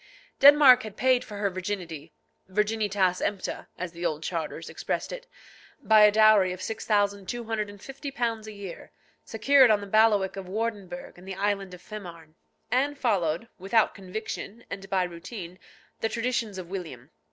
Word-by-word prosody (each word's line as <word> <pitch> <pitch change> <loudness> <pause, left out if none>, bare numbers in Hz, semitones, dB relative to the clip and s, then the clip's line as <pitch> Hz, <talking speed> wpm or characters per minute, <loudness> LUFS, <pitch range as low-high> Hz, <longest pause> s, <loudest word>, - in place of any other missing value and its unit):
Denmark 280 -3 +8
had 215 -4 -9
paid 255 -1 +3
for 205 - -9
her 200 -1 0
virginity 180 -5 -5 0.4
(virginitas 205 -2 +1
empta, 200 -2 -3
as 180 -1 -4
the 170 +1 -9
old 155 -2 -1
charters 165 -1 -4
expressed - - -3
it) - - -8 0.5
by 220 -1 +5
a 210 0 +8
dowry 215 -3 +5
of 180 - -6
£6,250 220 - -2
a - - -6
year, 200 -4 -9 0.3
secured 260 +3 +4
on 215 -1 +4
the 200 - -7
bailiwick 205 -2 +3
of 190 -2 -7
Wardinburg 200 -5 -4
and 185 - -14
the 190 - -5
island 195 -1 -1
of 180 - -17
Fehmarn. 170 -7 -10 0.4
Anne 280 +4 +1
followed, 195 - 0
without 195 +5 +2
conviction, 215 +3 -7
and 195 -1 -7
by 190 -1 +2
routine, 175 +1 -8 0.4
the 225 - 0
traditions 230 -4 -2
of 185 -2 -6
William. 165 -10 -7
205 Hz, 150 wpm, -27 LUFS, 185-225 Hz, 0.5 s, Denmark